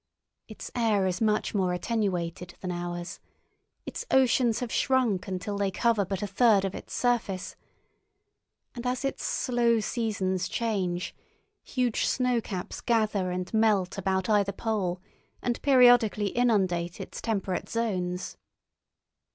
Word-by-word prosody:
Its 215 Hz, -, -9 dB
air 220 Hz, -5 st, +2 dB
is 185 Hz, +1 st, -1 dB
much 215 Hz, -1 st, +1 dB
more 185 Hz, -3 st, +1 dB
attenuated 180 Hz, -3 st, -2 dB
than 180 Hz, -, -4 dB
ours, 175 Hz, 0 st, -5 dB, 0.7 s
its -, -, -5 dB
oceans 250 Hz, -3 st, +3 dB
have 245 Hz, -2 st, -4 dB
shrunk 245 Hz, -9 st, +1 dB
until 195 Hz, +2 st, -3 dB
they 200 Hz, -1 st, +1 dB
cover 220 Hz, +2 st, +2 dB
but 195 Hz, +1 st, -3 dB
a -, -, +1 dB
third 200 Hz, 0 st, +3 dB
of 195 Hz, -, -3 dB
its -, -, -9 dB
surface, 230 Hz, -6 st, -1 dB, 1.2 s
and 245 Hz, -1 st, -5 dB
as 250 Hz, +2 st, -1 dB
its 275 Hz, -, -3 dB
slow 235 Hz, -2 st, +1 dB
seasons 200 Hz, -5 st, -1 dB
change 190 Hz, -6 st, -1 dB, 0.5 s
huge 250 Hz, -4 st, 0 dB
snowcaps 235 Hz, -7 st, -1 dB
gather 215 Hz, -5 st, +1 dB
and 180 Hz, +2 st, -4 dB
melt 210 Hz, -4 st, +2 dB
about 190 Hz, -1 st, -1 dB
either 205 Hz, -2 st, +3 dB
pole 200 Hz, -4 st, -2 dB, 0.4 s
and 240 Hz, -1 st, -1 dB
periodically 245 Hz, -6 st, +5 dB
inundate 185 Hz, -8 st, +1 dB
its -, -, -7 dB
temperate 195 Hz, -5 st, -2 dB
zones. 185 Hz, -6 st, -2 dB
205 Hz, 125 wpm, -28 LUFS, 185-235 Hz, 1.2 s, periodically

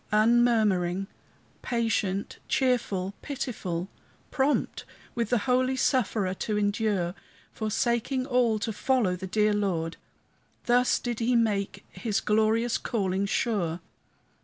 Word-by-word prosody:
Unmurmuring, 215 Hz, -5 st, +3 dB, 0.6 s
patient, 220 Hz, -5 st, -1 dB
cheerful, 215 Hz, -7 st, 0 dB
pitiful, 210 Hz, -, -4 dB, 0.4 s
Prompt 275 Hz, +2 st, 0 dB, 0.3 s
with 235 Hz, -3 st, -1 dB
the 245 Hz, -, +3 dB
holy 255 Hz, 0 st, +2 dB
sufferer 220 Hz, -8 st, +1 dB
to 210 Hz, +2 st, -2 dB
endure, 205 Hz, -3 st, 0 dB, 0.4 s
Forsaking 235 Hz, +4 st, -1 dB
all 245 Hz, -4 st, +2 dB
to 220 Hz, +1 st, -3 dB
follow 225 Hz, -5 st, +1 dB
the 190 Hz, +1 st, -6 dB
dear 210 Hz, +2 st, +2 dB
Lord, 175 Hz, -6 st, -1 dB, 0.7 s
Thus 245 Hz, +1 st, +3 dB
did 240 Hz, -2 st, -4 dB
he 240 Hz, +1 st, +2 dB
make 210 Hz, -4 st, 0 dB
his 205 Hz, +3 st, -1 dB
glorious 220 Hz, +2 st, +2 dB
calling 195 Hz, -3 st, -1 dB
sure. 185 Hz, -7 st, 0 dB
215 Hz, 110 wpm, -27 LUFS, 195-240 Hz, 0.7 s, Unmurmuring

